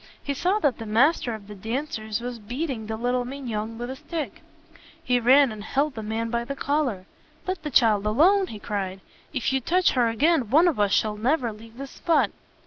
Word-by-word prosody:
He 280 - -2
saw 360 +9 +1
that 290 - +1
the 225 - -6
master 240 +2 +2
of 210 -2 -11
the 210 - -8
dancers 220 0 -4
was 245 -1 -5
beating 240 +1 -4
little 245 +3 -1
Mignon 230 -4 -5
with 240 +2 -5
a - - -5
stick. 305 +2 -5 0.6
He 250 -1 +2
ran 260 +2 +5
and 215 -1 -7
held 280 +6 0
the 220 - -6
man 225 +2 -3
by 235 0 0
the 275 +4 -5
collar. 275 -10 -1 0.4
"Let 370 -2 -3
the 300 - -4
child 215 -5 +3
alone!" 365 - +4
he 220 - -7
cried. 195 -2 -4 0.3
"If 265 -2 -1
you 265 - +1
touch 360 +7 +3
her 245 -3 +2
again, 275 +1 +2
one 315 +8 +5
of 315 -11 0
us 205 -1 +2
shall 210 +1 +1
never 245 0 0
leave 225 +2 -14
this 275 0 -7
spot." 335 - +1
245 Hz, 205 wpm, -25 LUFS, 220-285 Hz, 0.6 s, ran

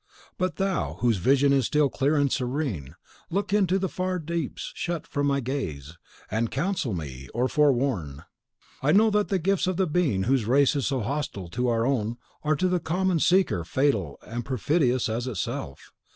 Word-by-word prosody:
But 185 -2 0
thou, 195 -2 -1
whose 120 -3 +3
vision 140 +8 +3
is 135 -4 +2
still 150 -1 +3
clear 140 +2 0
and 145 -2 +2
serene, 125 - -2 0.3
look 200 +3 -1
into 190 -3 +3
the 190 0 -1
far 185 0 -2
deeps 165 -2 -4
shut 170 -2 -3
from 145 -1 -1
my 140 0 +1
gaze, 80 - -4 0.4
and 115 +2 0
counsel 160 - -1
me, 70 -5 -7
or 125 +2 +2
forewarn! 125 - +1 0.6
I 145 +3 +3
know 215 +3 +5
that 210 0 +2
the 195 - +1
gifts 190 +2 +1
of 185 -2 0
the 190 - +3
Being 150 - +1
whose 130 0 +1
race 140 +5 +3
is 140 - 0
so 135 -3 0
hostile 115 -7 -3
to 125 +8 -1
our 115 -1 +1
own 120 -3 0 0.2
are, 155 0 +1
to 185 +5 +1
the 180 -1 +1
common 180 +1 0
seeker, 180 - +3
fatal 100 - 0
and 120 +2 -4
perfidious 130 - +1
as 115 +3 -2
itself. 90 - -5
140 Hz, 180 wpm, -26 LUFS, 115-170 Hz, 0.6 s, know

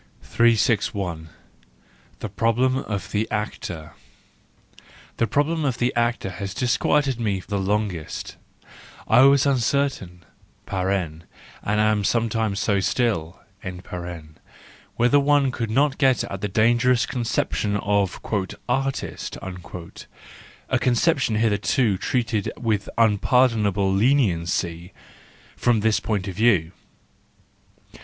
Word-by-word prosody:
The 100 -8 +1 1.1
Problem 125 +3 +2
of 105 -7 -4
the 110 +1 -1
Actor 90 -7 -5 1.2
.—The 115 - +1
problem 150 +7 0
of 130 -4 0
the 125 0 0
actor 120 -4 0
has 95 +1 -6
disquieted 130 +1 +1
me 100 -5 -1
the 100 -2 -1
longest 95 -4 -3 0.3
j - - -29 0.4
I - - +6
was 140 -1 +5
uncer¬ 140 +1 +1
tain 90 -2 -13 1.4
(and 105 +1 0
am 105 -1 +2
sometimes 110 -1 0
so 100 -1 +1
still) 95 -6 -1 1.5
whether 125 +5 +4
one 140 -1 +3
could 115 -3 -3
not 140 +5 +1
get 130 -4 +3
at 100 -1 -6
the 105 - -1
dangerous 120 +4 +3
conception 115 -5 -1
of 100 -2 0 0.4
" - - -38
artist 135 +2 -2
a 90 -2 -8
conception 130 -1 +2
hitherto 105 -1 +1
treated 115 -5 -1
with 110 -4 -1
unpardonable 105 -3 +2
leniency—from 95 -1 -1
this 110 -1 +2
point 105 -2 -2
of 95 - -4
view. 100 -7 +3
110 Hz, 105 wpm, -23 LUFS, 100-125 Hz, 1.5 s, I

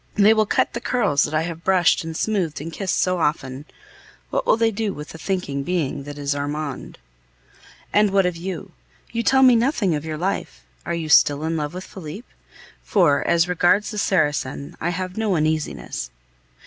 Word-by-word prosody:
They 210 +1 +6
will 215 -1 +2
cut - - +1
the 235 - -4
curls 205 - +1
that 150 - -6
I 155 - +2
have 165 0 -6
brushed 185 -1 +3
and 160 0 -5
smoothed 190 -8 -1
and 165 +3 -7
kissed 190 -2 -1
so 185 -1 +1
often! 145 -3 -2 0.7
What - - -1
will - - +4
they 225 -1 +2
do 210 -1 -2
with 150 0 -8
the 160 - -10
thinking 180 -8 -2
being 145 -4 -2
that 145 0 -8
is 145 0 -1
Armand? 145 0 -4 1.0
And 210 0 +4
what 195 -1 +3
of 180 -1 0
you? 185 +2 -6 0.4
You 230 - -1
tell 265 +2 +4
me 255 -2 +7
nothing 230 - +1
of 150 -1 -2
your 155 -1 -4
life. 150 - -3 0.2
Are - - -1
you 165 -2 -3
still 145 0 +5
in 165 +1 -1
love 150 +1 -3
with 185 - -5
Felipe? 190 +6 -9 0.6
For, 170 -9 +3
as 170 0 +3
regards 180 +4 +2
the 210 - -3
Saracen, 145 -7 0
I 170 - 0
have 185 +2 -4
no 215 -4 +1
uneasiness. 155 - -2
170 Hz, 190 wpm, -22 LUFS, 150-200 Hz, 1.0 s, me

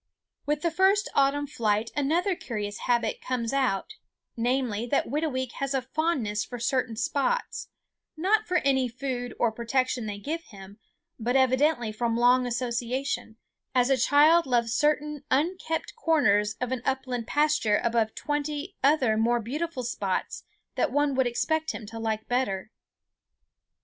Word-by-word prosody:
With 295 0 0
the 335 - +1
first 385 +4 +3
autumn 280 +1 +2
flight 225 -5 0
another 335 +7 +1
curious 210 -8 -5
habit 240 -1 +1
comes 245 -1 -2
out, 275 - 0 0.4
namely, 240 -2 0
that 275 - +1
Whitooweek 265 -3 -2
has 275 0 -1
a 265 - +1
fondness 260 -8 -1
for 245 - -7
certain 245 -1 0
spots, 280 - -1 0.5
not 420 +6 +2
for 360 0 +2
any 265 -2 +3
food 245 0 -4
or 235 - +3
protection 240 +1 -1
they 205 -1 -4
give 320 +10 -4
him, 200 0 -13 0.4
but 240 +3 -1
evidently 260 -2 +3
from 230 +1 -1
long 250 +1 +4
association, 240 0 -2 0.4
as 250 +1 +3
a - - +6
child 295 +6 +5
loves 235 -2 +1
certain 300 -1 0
unkempt 325 +3 -1
corners 235 - +2
of 250 0 -2
an 260 -2 -2
upland 255 -3 -2
pasture 295 -8 +2
above 230 -2 +1
twenty 295 +4 -3
other 265 -6 +3
more 235 +2 +2
beautiful 275 +4 -3
spots 200 -5 -3 0.3
that 295 - 0
one 290 +1 +2
would 260 -1 +2
expect 315 +6 -1
him 220 - -7
to 225 +2 -8
like 220 -1 -2
better. 225 -5 -1
255 Hz, 145 wpm, -27 LUFS, 230-295 Hz, 0.5 s, a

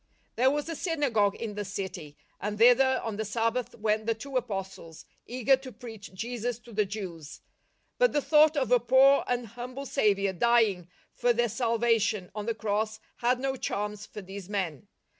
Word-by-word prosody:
There 255 +3 +4
was 295 +2 -1
a 330 - -4
synagogue 265 - +1
in 225 -2 -5
the 205 0 -4
city, 185 -7 -6 0.2
and 210 +2 -3
thither 250 +3 +5
on 225 -3 -4
the 220 - -1
Sabbath 230 +3 -1
went 215 0 -1
the 230 - +2
two 270 +5 -9
Apostles, 195 -8 -4 0.2
eager 255 +2 +3
to 260 -1 -10
preach 225 -4 -10
Jesus 235 +3 -3
to 235 - -14
the 210 0 +2
Jews. 175 -7 -7 0.6
But - - +5
the 295 - +2
thought 305 +1 +4
of 260 -3 0
a 245 - +6
poor 265 +4 +5
and 245 -1 -1
humble 250 +5 -7
Saviour 200 -5 +1
dying 215 -4 +2 0.3
for 240 0 +2
their 240 0 +1
salvation 230 -4 +1
on 210 +1 -5
the 230 - 0
Cross 215 0 -2 0.2
had 245 +1 +1
no 270 0 -1
charms 210 -3 -4
for 210 - -9
these 195 0 -9
men. 185 -9 -3
225 Hz, 180 wpm, -28 LUFS, 205-250 Hz, 0.6 s, a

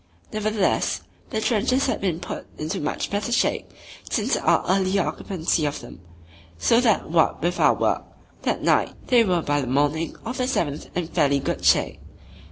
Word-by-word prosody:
Nevertheless, 215 -2 0 0.3
the 220 - -2
trenches 250 +4 +1
had 260 - -1
been 180 -4 -1
put - - -7
into 155 +1 -3
much 150 - -3
better 205 +3 -2
shape 240 - 0 0.4
since - - +1
our - - +2
earlier 190 +1 +2
occupancy 170 -3 -1
of 145 - -3
them, 120 - -11 0.6
so 230 - +3
that 220 -9 +1
what 165 -1 +3
with 175 +1 0
our - - +5
work - - 0 0.4
that - - -1
night - - +2
they 245 -3 +6
were 180 -5 +1
by 145 0 +1
the 130 - -4
morning 145 +5 0
of 245 +3 -4
the 250 - +1
seventh 155 - -2
in 175 - 0
fairly 145 -5 +2
good 140 - -3
shape. - - +3
180 Hz, 175 wpm, -24 LUFS, 155-215 Hz, 0.6 s, they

